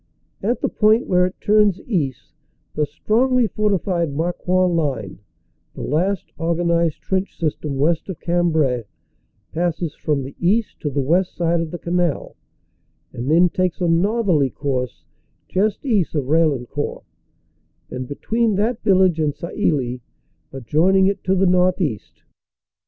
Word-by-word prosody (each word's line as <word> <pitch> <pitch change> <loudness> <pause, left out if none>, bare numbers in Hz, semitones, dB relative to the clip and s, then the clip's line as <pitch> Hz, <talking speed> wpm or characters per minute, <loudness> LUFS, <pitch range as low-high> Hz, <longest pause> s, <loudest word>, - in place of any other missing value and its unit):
At 235 +5 -1
the - - +1
point 215 +2 +3
where 180 0 +3
it 185 - -10
turns 210 -3 +3
east, 155 - -3 0.4
the 150 -1 0
strongly 240 - +2
fortified 195 -6 0
Marcoing 175 +4 0
line, 130 - -2 0.6
the - - -6
last 180 +7 -1
organized 170 -1 0
trench 190 0 -2
system 150 -3 -2
west 160 +6 0
of 185 - -6
Cambrai, 160 -9 +1 0.7
passes 170 -2 -2
from 145 -3 -1
the 135 +1 -9
east 205 +5 +1
to 150 - -2
the 140 0 -1
west 175 +7 +1
side 170 -1 +1
of 165 - -4
the 175 - -5
canal, 175 -3 -1 0.8
and 120 +3 -4
then 170 +3 +5
takes 180 0 -1
a 175 - +1
northerly 175 - +2
course 130 -3 -3 0.4
just 205 +7 0
east 205 - +1
of 145 - +1
Raillen 150 -3 +2
court 145 +4 -4 0.9
and 125 0 -5
between 225 - 0
that 220 +4 0
village 190 -5 +3
and 150 -2 0
Sailly, 145 - -1 0.5
adjoining 160 +9 +2
it 200 +1 0
to 190 - +2
the 190 +1 +2
northeast. 180 - 0
170 Hz, 140 wpm, -21 LUFS, 150-190 Hz, 0.9 s, then